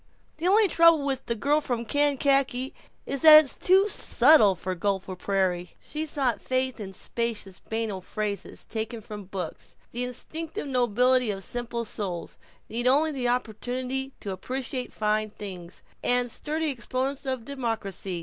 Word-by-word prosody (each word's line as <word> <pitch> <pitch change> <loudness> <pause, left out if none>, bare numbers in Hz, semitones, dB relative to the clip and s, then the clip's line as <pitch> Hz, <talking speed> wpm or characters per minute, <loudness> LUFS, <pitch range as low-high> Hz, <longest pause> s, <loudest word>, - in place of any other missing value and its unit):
The 330 +3 -1
only 415 +2 +5
trouble 335 -4 +5
with 270 -2 -2
'The 235 - 0
Girl 290 +7 +2
from 240 -4 -3
Kankakee' 275 -1 +1 0.3
is 275 - -3
that 310 -1 +10
it's 275 - -2
too 380 +3 +4
subtle 250 - +5
for 185 +2 -4
Gopher 190 +1 -2
Prairie!" 180 -2 -1
She 310 +1 -3
sought 270 -6 0
faith 260 -1 -1
in 195 -2 -6
spacious 215 -3 -3
banal 220 -4 -3
phrases, 205 0 -4
taken 225 +1 -4
from 210 -1 -8
books: 180 -3 -6 0.2
"the 245 +1 -1
instinctive 315 - -4
nobility 250 -1 +2
of 195 -1 -3
simple 235 0 -3
souls," 190 -5 -4 0.3
"need 240 +2 -2
only 295 +5 +4
the 260 -4 -2
opportunity, 250 +3 -2
to 200 - -4
appreciate 255 +5 -4
fine 215 0 0
things," 185 -4 -9 0.2
and 245 -1 +2
"sturdy 310 +3 -2
exponents 265 +2 -3
of 260 -3 -2
democracy." 220 -9 -3
245 Hz, 150 wpm, -26 LUFS, 210-275 Hz, 0.3 s, that